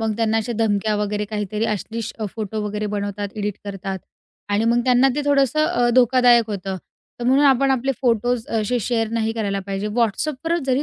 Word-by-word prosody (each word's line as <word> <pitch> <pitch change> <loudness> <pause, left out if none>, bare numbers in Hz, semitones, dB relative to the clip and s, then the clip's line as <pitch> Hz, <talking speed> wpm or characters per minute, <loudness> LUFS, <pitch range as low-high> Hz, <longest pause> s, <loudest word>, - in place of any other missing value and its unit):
मग 220 -1 -1
त्यांना 225 -1 +1
अशा 225 +2 -1
धमक्या 210 -1 +1
वगैरे 210 0 -1
काहीतरी 210 +1 -3
अश्लील 220 +1 -3
अ, 220 - -3
फोटो 215 -1 -3
वगैरे 210 0 -3
बनवतात, 205 0 -3
एडिट 205 -1 -2
करतात 195 -1 -5 0.5
आणि 205 +2 +1
मग 235 +1 +3
त्यांना 255 +1 +4
ते 295 - -1
थोडंसं 285 +1 +3
अ, 280 -8 +1
धोकादायक 245 -2 +5
होतं. 195 -1 -4 0.4
तर 240 - -3
म्हणून 270 +3 +4
आपण 270 0 +4
आपले 265 +1 +1
फोटोज 245 -1 +1
असे 245 +4 0
शेअर 225 0 0
नाही 225 -1 0
करायला 200 -3 -2
पाहिजे. 195 +1 -3
WhatsAppवर 260 +9 0
जरी 265 +1 +2
225 Hz, 185 wpm, -21 LUFS, 210-250 Hz, 0.5 s, धोकादायक